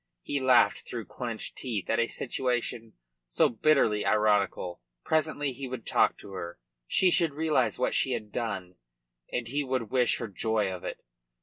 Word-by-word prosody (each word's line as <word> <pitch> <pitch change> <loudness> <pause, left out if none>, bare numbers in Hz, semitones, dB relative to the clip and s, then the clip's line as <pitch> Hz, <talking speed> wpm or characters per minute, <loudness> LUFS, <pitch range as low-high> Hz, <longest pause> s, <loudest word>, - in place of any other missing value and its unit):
He 145 - -1
laughed 130 -3 +4
through 115 -3 -5
clenched 120 -3 -5
teeth 110 -8 -3
at 115 - +1
a 115 - +3
situation 120 -3 -2 0.3
so - - +3
bitterly 115 -4 +3
ironical. 105 - +1 0.2
Presently 145 -3 0
he 135 +1 -6
would 125 -2 -6
talk - - +3
to 100 - -12
her. 85 -2 -6 0.3
She 185 - +4
should 165 -5 +2
realise 160 0 +1
what - - 0
she - - +2
had 105 -1 -5
done, 95 -7 -4 0.5
and 125 -2 -2
he 145 +4 -1
would 130 -5 -2
wish 125 -3 +3
her 115 - -4
joy 105 +1 0
of 90 - -8
it. - - -6
115 Hz, 170 wpm, -29 LUFS, 105-130 Hz, 0.5 s, laughed